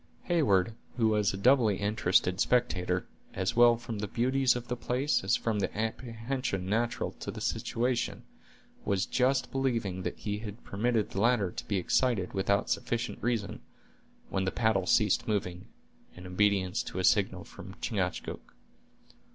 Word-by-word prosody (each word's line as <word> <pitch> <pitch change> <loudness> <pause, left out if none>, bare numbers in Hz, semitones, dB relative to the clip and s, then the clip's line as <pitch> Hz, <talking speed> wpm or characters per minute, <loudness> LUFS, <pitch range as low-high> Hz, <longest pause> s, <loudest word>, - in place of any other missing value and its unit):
Heyward, 115 - +2 0.2
who 115 -2 +3
was 105 -2 +2
a 95 - -5
doubly 115 -1 +4
interested 95 -3 +1
spectator, 90 -8 +1 0.3
as 95 0 -1
well 120 0 +6
from 115 -2 -6
the 105 - -2
beauties 130 +4 +2
of 120 0 -5
the 125 - -2
place 125 +3 0
as 95 - +3
from 110 -3 -1
the 100 - -2
apprehension 115 -2 -3
natural 115 +4 -1
to - - -6
his - - -7
situation, 120 +1 -1 0.6
was 100 -1 0
just 130 +1 +1
believing 115 -9 -1
that - - -4
he 105 -1 -3
had 105 +1 -8
permitted 110 +1 0
the 100 - -2
latter 115 -5 +2
to - - -7
be 100 - 0
excited 95 +1 +1
without 100 +1 +1
sufficient 120 0 -2
reason, 115 -5 -2 0.7
when 95 0 0
the 95 - 0
paddle 110 -5 +1
ceased 105 -3 +3
moving, 90 -4 -2 0.5
in 90 - -11
obedience 95 +1 +1
to - - -7
a 95 - -1
signal - - +2
from - - -11
Chingachgook. - - -3
110 Hz, 155 wpm, -30 LUFS, 95-120 Hz, 0.7 s, well